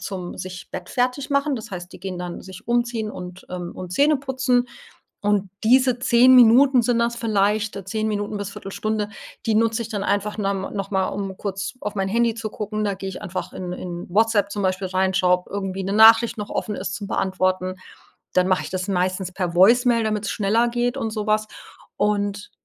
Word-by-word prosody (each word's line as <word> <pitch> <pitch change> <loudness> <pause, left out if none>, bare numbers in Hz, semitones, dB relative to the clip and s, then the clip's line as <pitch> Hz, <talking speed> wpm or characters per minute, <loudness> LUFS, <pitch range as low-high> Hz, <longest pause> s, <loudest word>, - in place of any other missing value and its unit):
zum 185 -3 -6
Sich 185 -1 -7
bettfertig 250 +9 -2
machen. 280 +1 +1
Das 225 -5 -7
heißt, 180 -1 -7
die - - -12
gehen 185 -2 -5
dann 175 -1 -6
sich 190 -1 -12
umziehen 235 -2 0
und, 180 0 -9
ähm 180 -1 -5
und 180 -1 -7
Zähne 290 +7 +4
putzen 260 -2 +1 0.6
und 205 -2 0
diese 255 +2 +4
10 250 +1 +5
Minuten 250 +2 +6
sind 235 0 +1
das 235 0 +1
vielleicht, 215 -2 0
äh, 200 - -6
10 215 +3 -2
Minuten 205 0 -2
bis 200 -1 -5
1/4 195 - -8
Stunde, 210 +1 -2 0.4
die 220 - +2
nutze 225 +1 +2
ich 230 - -6
dann 205 -3 -3
einfach 205 +1 -1
norm 195 -2 -2
noch 195 0 -4
mal, 190 -1 +1
um 195 -1 -4
kurz 195 +1 -4
auf 210 0 -4
mein 195 -1 0
Handy 230 +2 +1
zu 220 -2 -5
gucken. 215 0 -3
Da 205 -1 0
gehe 190 0 -6
ich 190 - -8
einfach 190 -3 -5
in 180 -1 -5
in 175 -1 -6
Whatsapp 210 0 +2
zum 205 - -3
Beispiel 190 0 0
rein, 190 +1 +1
schaue 180 -1 +4
ob 180 - -21
irgendwie 195 -1 -3
'ne 195 - -3
Nachricht 225 +2 +7
noch 210 -1 -5
offen 210 - -2
ist 185 - -4
zum 200 0 -5
Beantworten. 185 -1 0 0.6
Dann 185 0 +3
mache 185 -1 +2
ich - - -6
das 185 -1 -3
meistens 185 -1 -1
per 180 -2 -3
Voicemail, 230 +5 +5
damit's 215 -1 -1
schneller 225 +3 +2
geht 245 +2 -1
und 225 -4 -2
so 215 -1 -3
was 215 0 +1 0.5
und 205 -1 -1
205 Hz, 205 wpm, -22 LUFS, 190-230 Hz, 0.6 s, Nachricht